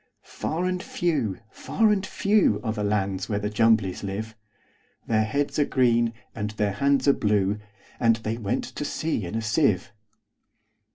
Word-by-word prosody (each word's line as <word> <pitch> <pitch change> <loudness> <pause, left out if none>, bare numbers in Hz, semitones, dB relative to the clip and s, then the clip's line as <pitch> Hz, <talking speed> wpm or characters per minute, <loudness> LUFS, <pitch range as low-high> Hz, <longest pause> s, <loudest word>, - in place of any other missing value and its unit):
Far 170 +3 -3
and 185 0 -1
few, 150 - -1
far 220 -2 +1
and 200 -2 +1
few, 200 - +2
Are 110 -2 -1
the 105 -2 -3
lands 100 -2 -1
where 105 - 0
the 105 +1 -2
Jumblies 110 -3 +2
live:Their 110 +1 -5
heads 140 +7 -1
are 145 - +4
green, 120 -3 +2 0.2
and 105 -1 -3
their 105 -1 -1
hands 140 +7 +2
are 140 - +7
blue; 105 -2 +1 0.4
And 115 -1 +4
they 110 0 -4
went 100 -3 -1
to - - -6
sea 145 - -2
in 105 - -6
a 115 - -1
sieve. 110 - +1
110 Hz, 160 wpm, -25 LUFS, 105-140 Hz, 0.4 s, are